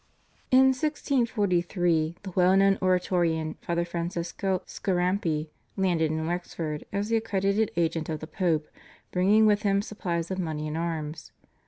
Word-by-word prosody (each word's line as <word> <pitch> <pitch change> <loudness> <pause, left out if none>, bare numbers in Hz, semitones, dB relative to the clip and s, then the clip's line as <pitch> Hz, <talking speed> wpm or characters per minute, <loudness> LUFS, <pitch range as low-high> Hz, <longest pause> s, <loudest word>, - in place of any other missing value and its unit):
In 265 +1 +6
1643 200 - 0
the 190 - -6
well 185 +1 +4
known 195 0 +4
Oratorian, 175 -4 +1
Father 170 0 -1
Francesco 175 +2 -2
Scarampi, 175 -4 -1 0.3
landed 175 -5 +2
in 160 0 -2
Wexford 165 -3 -4
as 200 +2 -2
the 230 - +3
accredited 205 -1 0
agent 165 -1 0
of 155 -1 -2
the - - -6
Pope, 160 -3 0 0.4
bringing 200 +4 +4
with 210 -1 +4
him 200 -2 +2
supplies 175 -5 -3
of 190 - -2
money 155 -3 -3
and 150 - -4
arms. 160 -2 -4
180 Hz, 140 wpm, -27 LUFS, 165-195 Hz, 0.4 s, In